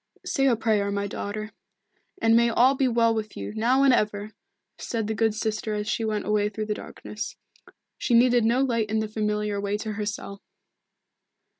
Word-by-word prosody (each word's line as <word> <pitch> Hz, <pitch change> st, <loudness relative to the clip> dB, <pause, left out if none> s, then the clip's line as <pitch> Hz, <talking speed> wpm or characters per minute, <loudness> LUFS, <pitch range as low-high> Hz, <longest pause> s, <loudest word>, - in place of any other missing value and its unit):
"Say 275 Hz, -1 st, +1 dB
a 245 Hz, -, +4 dB
prayer, 215 Hz, -3 st, +1 dB
my 200 Hz, 0 st, -1 dB
daughter 215 Hz, +2 st, -5 dB, 0.7 s
and 225 Hz, -5 st, +4 dB
may 235 Hz, 0 st, +5 dB
all 245 Hz, +3 st, +4 dB
be 270 Hz, -1 st, +1 dB
well 230 Hz, -1 st, +3 dB
with 215 Hz, -1 st, -4 dB
you, -, -, -5 dB
now 245 Hz, +5 st, +2 dB
and 270 Hz, -2 st, +6 dB
ever!" 210 Hz, -2 st, 0 dB, 0.5 s
said 225 Hz, -2 st, -3 dB
the 220 Hz, -, -2 dB
good 220 Hz, -1 st, +1 dB
sister 215 Hz, 0 st, -2 dB
as 210 Hz, 0 st, -3 dB
she 230 Hz, -, -1 dB
went 215 Hz, -1 st, -1 dB
away 210 Hz, 0 st, +1 dB
through 215 Hz, +1 st, -4 dB
the 210 Hz, -, -1 dB
darkness. 210 Hz, 0 st, -7 dB, 0.6 s
She 240 Hz, -, +1 dB
needed 245 Hz, 0 st, +5 dB
no 235 Hz, +4 st, +3 dB
light 230 Hz, -5 st, 0 dB
in 220 Hz, -, 0 dB
the 220 Hz, 0 st, 0 dB
familiar 210 Hz, -1 st, -1 dB
way 200 Hz, +1 st, -1 dB
to 215 Hz, +1 st, -4 dB
her 210 Hz, 0 st, -3 dB
cell. 205 Hz, -3 st, -6 dB
220 Hz, 190 wpm, -25 LUFS, 210-235 Hz, 0.7 s, and